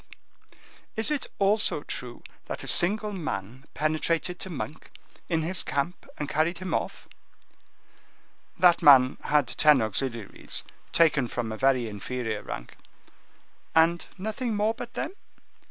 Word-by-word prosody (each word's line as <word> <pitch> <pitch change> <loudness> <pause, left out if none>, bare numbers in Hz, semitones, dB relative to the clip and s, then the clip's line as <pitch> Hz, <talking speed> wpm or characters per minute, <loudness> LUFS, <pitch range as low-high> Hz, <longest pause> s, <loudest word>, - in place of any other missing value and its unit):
"Is 220 +6 +1
it 295 -3 -1
also 200 -6 +2
true 120 -1 -7 0.2
that - - -5
a - - -7
single 210 +4 +3
man 130 - -5
penetrated 155 +4 0
to 190 - -5
Monk, 155 -1 -6 0.4
in 165 -2 +1
his 180 +2 0
camp, 145 +6 -3
and 150 - -3
carried 155 +4 +1
him 185 +1 -4
off?" - - -3 1.5
"That 175 -2 +5
man 130 -3 +7
had 145 -4 +3
ten 150 -3 +5
auxiliaries, 115 0 -3 0.3
taken 150 -6 +4
from 115 -1 -3
a - - -3
very 130 -2 +2
inferior 110 +1 -4
rank." - - -8 1.0
"And 165 +1 +4
nothing 220 +4 -2
more 210 +2 +2
but 235 +1 -9
them?" - - -2
155 Hz, 130 wpm, -27 LUFS, 125-185 Hz, 1.5 s, man